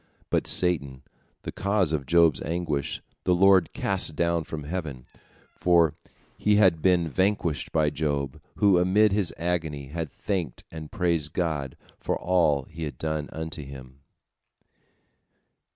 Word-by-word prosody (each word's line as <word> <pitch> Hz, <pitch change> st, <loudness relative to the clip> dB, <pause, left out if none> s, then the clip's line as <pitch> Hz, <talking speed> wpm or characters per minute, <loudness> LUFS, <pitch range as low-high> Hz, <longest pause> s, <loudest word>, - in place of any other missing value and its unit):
But -, -, +1 dB
Satan, 70 Hz, -7 st, +2 dB, 0.4 s
the -, -, -5 dB
cause 100 Hz, -5 st, 0 dB
of 70 Hz, -4 st, -2 dB
Job's 85 Hz, -3 st, +4 dB
anguish, 80 Hz, -4 st, -3 dB, 0.2 s
the 90 Hz, -, +2 dB
Lord 95 Hz, -1 st, +4 dB
cast 95 Hz, -5 st, -1 dB
down 85 Hz, +1 st, 0 dB
from 75 Hz, -1 st, -6 dB
heaven, 75 Hz, -6 st, -5 dB, 0.5 s
for 85 Hz, -3 st, +3 dB, 0.5 s
he 105 Hz, 0 st, +3 dB
had 95 Hz, -6 st, +4 dB
been 90 Hz, -2 st, +3 dB
vanquished 95 Hz, -2 st, -1 dB
by 75 Hz, -2 st, +2 dB
Job, 70 Hz, -3 st, -2 dB
who 100 Hz, -3 st, +4 dB
amid 100 Hz, +4 st, +3 dB
his 100 Hz, -3 st, 0 dB
agony 80 Hz, -5 st, -3 dB
had 80 Hz, 0 st, -5 dB
thanked 90 Hz, -10 st, -4 dB
and 80 Hz, -2 st, -8 dB
praised 85 Hz, -5 st, 0 dB
God 75 Hz, -7 st, -2 dB, 0.2 s
for -, -, -2 dB
all 85 Hz, -6 st, +2 dB
He 80 Hz, +4 st, -7 dB
had 75 Hz, -, -7 dB
done 80 Hz, -1 st, -3 dB
unto 80 Hz, -1 st, -6 dB
him. 65 Hz, -1 st, -12 dB
80 Hz, 135 wpm, -26 LUFS, 75-90 Hz, 0.5 s, Job's